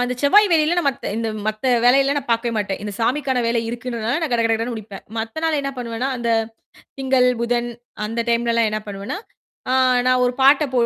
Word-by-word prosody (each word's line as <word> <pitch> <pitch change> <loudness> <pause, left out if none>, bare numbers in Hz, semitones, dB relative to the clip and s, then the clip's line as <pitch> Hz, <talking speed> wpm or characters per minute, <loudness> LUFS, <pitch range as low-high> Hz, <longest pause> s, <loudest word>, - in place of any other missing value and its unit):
அந்தச் 250 0 -2
செவ்வாய், 410 +9 +6
வெள்ளியில 330 +2 +3
மத்த 275 0 -3
இந்த 225 -1 -2 0.2
மத்த 215 +3 -5 0.2
வேலையெல்லா 270 +3 +4
நான் 275 -3 -7
பார்க்கவேமாட்டேன். 225 -4 -1
இந்தச் 205 -2 -6
சாமிக்கான 260 +2 0
வேலை 230 0 +1
இருக்குன்றதுனால 240 +1 -3
நான் 310 -6 -2
கட 235 - +2
கட 230 - +2
கடன்னு 230 +2 -3
முடிப்பேன். 210 -2 -9
மத்த 225 +8 -4
நாள் 320 -2 +1
என்ன 275 0 -3
பண்ணுவேன்னா, 240 +1 -3
அந்த 235 -1 -3 0.7
திங்கள், 260 -1 +3
புதன் 240 0 0 0.4
அந்த 225 +2 -2
டைம்லலாம் 235 -1 +2
என்ன 215 - -1
பண்ணுவேன்னா, 200 - -5 0.5
அ - - +2 0.3
நான் 255 0 +3
ஒரு 245 - +1
பாட்டைப் 275 0 +4
240 Hz, 180 wpm, -21 LUFS, 230-270 Hz, 0.7 s, செவ்வாய்